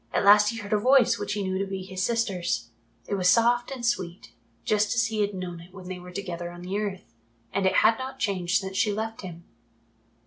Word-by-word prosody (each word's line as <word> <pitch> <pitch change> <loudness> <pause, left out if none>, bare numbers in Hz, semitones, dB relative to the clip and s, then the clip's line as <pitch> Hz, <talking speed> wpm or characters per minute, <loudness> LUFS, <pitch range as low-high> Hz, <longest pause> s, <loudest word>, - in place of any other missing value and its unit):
At - - 0
last 210 +1 +7
he 230 - -4
heard 205 -1 -4
a 210 - +3
voice 255 +2 +4
which - - -2
he 205 -1 -2
knew 190 0 -1
to 195 - -1
be 190 -1 -5
his 185 0 -5
sister's. 190 - -1 0.4
It - - -4
was 185 -2 +3
soft 240 +2 +3
and 260 -3 -5
sweet, 185 -7 -2 0.3
just 210 +2 +2
as 230 -1 +3
he 220 -1 -1
had 205 -1 0
known 180 -2 -5
it 170 +2 -14
when 185 -1 -9
they 185 -1 -5
were 180 0 -11
together 175 -2 -5
on 175 0 -10
the 185 +2 -4
earth, 190 - -5 0.4
and 195 -1 +2
it 190 - +2
had 225 +2 +5
not 260 +1 -6
changed 190 -6 0
since 190 -1 -6
she 210 +1 +2
left 220 +2 -4
him. 170 -3 -9
200 Hz, 235 wpm, -26 LUFS, 185-225 Hz, 0.4 s, last